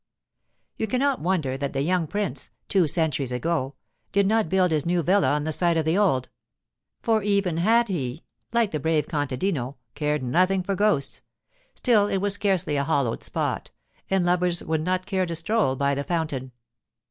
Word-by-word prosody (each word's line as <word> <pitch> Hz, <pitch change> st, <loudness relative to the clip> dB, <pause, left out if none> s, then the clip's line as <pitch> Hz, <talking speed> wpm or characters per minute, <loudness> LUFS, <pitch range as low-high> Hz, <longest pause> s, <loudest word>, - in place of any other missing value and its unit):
You 220 Hz, -, -1 dB
cannot 265 Hz, +4 st, +1 dB
wonder 160 Hz, -7 st, 0 dB
that 140 Hz, 0 st, -3 dB
the 135 Hz, 0 st, 0 dB
young 175 Hz, 0 st, +1 dB
prince 205 Hz, +3 st, -3 dB, 0.2 s
(two 185 Hz, -5 st, +3 dB
centuries 150 Hz, -5 st, 0 dB
ago) 135 Hz, +1 st, -1 dB, 0.4 s
did 200 Hz, 0 st, +3 dB
not 220 Hz, -3 st, +2 dB
build 185 Hz, -1 st, +2 dB
his 155 Hz, -3 st, +1 dB
new 175 Hz, 0 st, 0 dB
villa 190 Hz, +5 st, +3 dB
on 150 Hz, 0 st, 0 dB
the 155 Hz, -, -2 dB
site 170 Hz, +1 st, +2 dB
of 160 Hz, -, 0 dB
the 160 Hz, +2 st, +2 dB
old; 175 Hz, -11 st, +2 dB, 0.8 s
for 225 Hz, -2 st, +2 dB
even 200 Hz, -4 st, +1 dB
had 230 Hz, +7 st, +3 dB
he, 150 Hz, -, -3 dB, 0.3 s
like 235 Hz, -3 st, +2 dB
the 155 Hz, -, -2 dB
brave 155 Hz, 0 st, 0 dB
contadino, 145 Hz, -2 st, -2 dB, 0.2 s
cared 150 Hz, -1 st, -1 dB
nothing 185 Hz, +9 st, +2 dB
for 195 Hz, -, -1 dB
ghosts, 195 Hz, -8 st, +1 dB, 0.5 s
still 215 Hz, -5 st, +3 dB
it 195 Hz, -, 0 dB
was 200 Hz, +1 st, +1 dB
scarcely 190 Hz, -7 st, +1 dB
a 140 Hz, -, +1 dB
hallowed 140 Hz, -6 st, 0 dB
spot, -, -, -3 dB, 0.4 s
and 190 Hz, -2 st, +2 dB
lovers 175 Hz, 0 st, +1 dB
would 160 Hz, -1 st, -1 dB
not 185 Hz, +2 st, -1 dB
care 185 Hz, -1 st, -1 dB
to 170 Hz, -, -3 dB
stroll 170 Hz, -4 st, +1 dB
by 140 Hz, +1 st, +1 dB
the 140 Hz, +1 st, -2 dB
fountain. 145 Hz, -6 st, -3 dB
170 Hz, 180 wpm, -25 LUFS, 145-195 Hz, 0.8 s, two